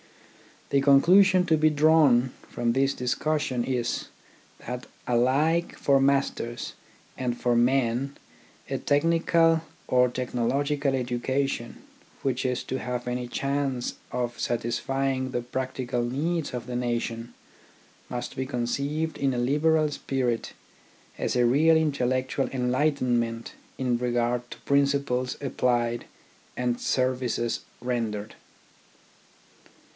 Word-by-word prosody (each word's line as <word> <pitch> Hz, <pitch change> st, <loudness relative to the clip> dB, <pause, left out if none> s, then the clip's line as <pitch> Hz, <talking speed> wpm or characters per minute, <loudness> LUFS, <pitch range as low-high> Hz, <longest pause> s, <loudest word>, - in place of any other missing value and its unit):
The 140 Hz, -, +3 dB
conclusion 180 Hz, +7 st, +6 dB
to 160 Hz, -, +4 dB
be 155 Hz, +1 st, +4 dB
drawn 145 Hz, -5 st, +4 dB, 0.2 s
from 120 Hz, -1 st, 0 dB
this 135 Hz, +2 st, +2 dB
discus 150 Hz, +5 st, 0 dB
sion 125 Hz, -5 st, -1 dB
is, 125 Hz, -3 st, -1 dB, 0.6 s
that 125 Hz, +1 st, -5 dB, 0.2 s
alike 140 Hz, +8 st, +2 dB
for 140 Hz, -1 st, +3 dB
masters 135 Hz, -3 st, 0 dB, 0.4 s
and 125 Hz, -2 st, -2 dB
for 120 Hz, -1 st, +2 dB
men 130 Hz, +2 st, +1 dB, 0.5 s
a -, -, -2 dB
technical 165 Hz, +2 st, +3 dB, 0.3 s
or 125 Hz, 0 st, +4 dB
technological 135 Hz, +3 st, 0 dB
education, 125 Hz, 0 st, -2 dB, 0.4 s
which 130 Hz, -1 st, -1 dB
is 125 Hz, -1 st, -1 dB
to 130 Hz, -, -3 dB
have 125 Hz, -1 st, -4 dB
any 125 Hz, 0 st, -2 dB
chance 135 Hz, -1 st, -2 dB, 0.2 s
of 120 Hz, -1 st, -3 dB
satisfying 130 Hz, +3 st, -1 dB
the 120 Hz, -, -1 dB
practical 125 Hz, 0 st, -3 dB
needs 155 Hz, +7 st, -1 dB
of 125 Hz, -1 st, -4 dB
the 125 Hz, 0 st, -5 dB
nation, 120 Hz, -1 st, -2 dB, 0.8 s
must 125 Hz, +2 st, -5 dB
be 130 Hz, 0 st, -2 dB
conceived 140 Hz, +5 st, -2 dB
in 135 Hz, -2 st, 0 dB
a -, -, -2 dB
liberal 150 Hz, +5 st, +2 dB
spirit 125 Hz, -5 st, -2 dB, 0.6 s
as -, -, -1 dB
a 125 Hz, -1 st, +4 dB
real 155 Hz, +7 st, +5 dB
intellectual 130 Hz, -3 st, 0 dB
enlightenment 125 Hz, -3 st, 0 dB, 0.3 s
in 125 Hz, -2 st, 0 dB
regard 120 Hz, 0 st, -1 dB
to -, -, -9 dB
principles 140 Hz, -3 st, +1 dB
applied 120 Hz, -3 st, 0 dB, 0.5 s
and 125 Hz, -1 st, 0 dB
services 125 Hz, -2 st, 0 dB, 0.2 s
rendered. 115 Hz, -4 st, -3 dB
130 Hz, 110 wpm, -26 LUFS, 120-140 Hz, 0.8 s, conclusion